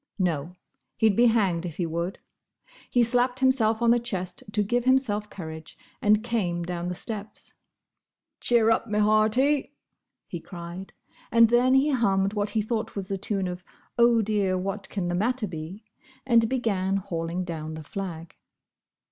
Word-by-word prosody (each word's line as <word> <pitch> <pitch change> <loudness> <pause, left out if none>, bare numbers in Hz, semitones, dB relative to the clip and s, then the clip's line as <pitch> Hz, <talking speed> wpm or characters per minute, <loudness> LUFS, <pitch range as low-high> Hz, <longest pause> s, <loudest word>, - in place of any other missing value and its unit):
No! 175 -3 -1 0.4
He'd 220 -3 +3
be 240 +3 +5
hanged 195 -7 +2
if 170 -4 -6
he 175 - 0
would. 170 +3 -3 0.7
He 245 - +3
slapped 245 +2 +2
himself 235 -4 +2
on 235 - +5
the 240 - +4
chest 185 -7 -4
to 210 0 +1
give 240 +4 0
himself 240 -6 +2
courage, 160 -3 -9 0.2
and 210 +1 +3
came 190 -8 -1
down 175 0 -4
the 180 - -3
steps. 210 +2 -6 0.9
"Cheer 230 -2 +3
up, 225 - +1
my 210 -1 -1
hearty!" 215 +7 +3 0.6
he 175 - -6
cried; 175 +2 -9 0.4
and 230 -1 +6
then 250 +2 +4
he 280 +3 +3
hummed 195 -6 +1
what 205 -1 -1
he 215 +1 0
thought 225 0 -3
was 195 -2 -5
the 195 - -1
tune 195 -1 -1
of 180 0 -6 0.3
"Oh! 235 -1 +4
dear! 200 -3 0
what 195 +1 -4
can 190 -4 -3
the 175 - -1
matter 220 +5 0
be?" 175 +4 -8 0.4
and 230 -3 +4
began 195 -7 0
hauling 170 -1 -3
down 160 -3 -5
the 155 - -8
flag. 170 -1 -6
205 Hz, 165 wpm, -26 LUFS, 180-230 Hz, 0.9 s, and